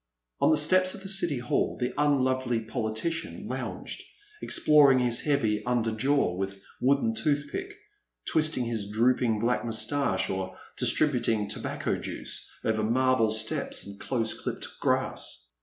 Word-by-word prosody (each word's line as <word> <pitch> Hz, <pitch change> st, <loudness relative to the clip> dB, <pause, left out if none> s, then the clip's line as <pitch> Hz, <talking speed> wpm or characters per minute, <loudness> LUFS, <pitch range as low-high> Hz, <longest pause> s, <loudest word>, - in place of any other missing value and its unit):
On -, -, +4 dB
the 155 Hz, -, +4 dB
steps 185 Hz, +6 st, +4 dB
of 200 Hz, -, -10 dB
the -, -, -6 dB
City 175 Hz, -7 st, +2 dB
Hall 120 Hz, 0 st, -1 dB
the 125 Hz, 0 st, -2 dB
unlovely 130 Hz, -4 st, +1 dB
poli 110 Hz, -1 st, -3 dB
tician 165 Hz, +7 st, -3 dB
lounged, -, -, -5 dB, 0.4 s
exploring 145 Hz, -3 st, +5 dB
his 120 Hz, -2 st, +3 dB
heavy 110 Hz, -8 st, +1 dB
under 120 Hz, -2 st, 0 dB
jaw 130 Hz, -1 st, +1 dB
with 95 Hz, +1 st, -4 dB, 0.2 s
wooden 140 Hz, -, +2 dB
toothpick, 220 Hz, -, -2 dB, 0.5 s
twisting 155 Hz, -5 st, +1 dB
his 110 Hz, -4 st, -3 dB
drooping 115 Hz, +1 st, +2 dB
black 120 Hz, +2 st, 0 dB
moustache, 115 Hz, -1 st, +1 dB
or 95 Hz, 0 st, -4 dB, 0.2 s
distributing 115 Hz, -8 st, +2 dB
tobacco -, -, -2 dB
juice -, -, -6 dB, 0.2 s
over 110 Hz, -1 st, +1 dB
marble 125 Hz, +1 st, +2 dB
steps 110 Hz, 0 st, -1 dB
and 100 Hz, 0 st, -10 dB
close 115 Hz, -4 st, -1 dB
clipped -, -, -5 dB
grass. -, -, -1 dB
125 Hz, 140 wpm, -28 LUFS, 110-145 Hz, 0.5 s, exploring